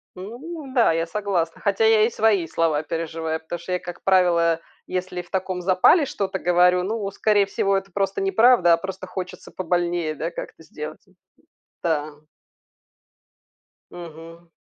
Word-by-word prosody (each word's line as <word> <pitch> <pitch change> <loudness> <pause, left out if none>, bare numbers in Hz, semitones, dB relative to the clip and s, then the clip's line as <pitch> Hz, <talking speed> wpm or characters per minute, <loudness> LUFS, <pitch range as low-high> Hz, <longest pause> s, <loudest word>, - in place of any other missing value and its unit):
Ну 265 - -8
да, 235 -9 +4
я 165 0 0
согласна, 180 -4 -2
хотя 200 +2 +1
я 220 -1 +5
и 230 - +1
свои 215 -6 +2
слова 155 -2 0
переживаю. 160 0 -3
Потому 165 +2 -6
что 170 +2 -8
я, 180 - 0
как 175 -1 -9
правило, 170 -3 +3 0.3
если 185 -1 -4
в 175 - -19
таком 185 -1 -2
запале 185 - +4
что-то 195 -7 -3
говорю, 180 0 +3
ну, 205 0 -2
скорее 205 0 +2
всего, 195 0 0
это 195 0 -6
просто 195 +1 -1
неправда, 195 -1 +5
а - - +4
просто 190 +1 -7
хочется 185 0 -7
побольнее 175 -3 -1
да 160 +3 -3
как-то 160 - -8
сделать 155 0 -8
и 190 - -26 0.7
да. 155 -2 0 1.8
Мгм. 165 0 -11
180 Hz, 150 wpm, -23 LUFS, 165-195 Hz, 1.8 s, я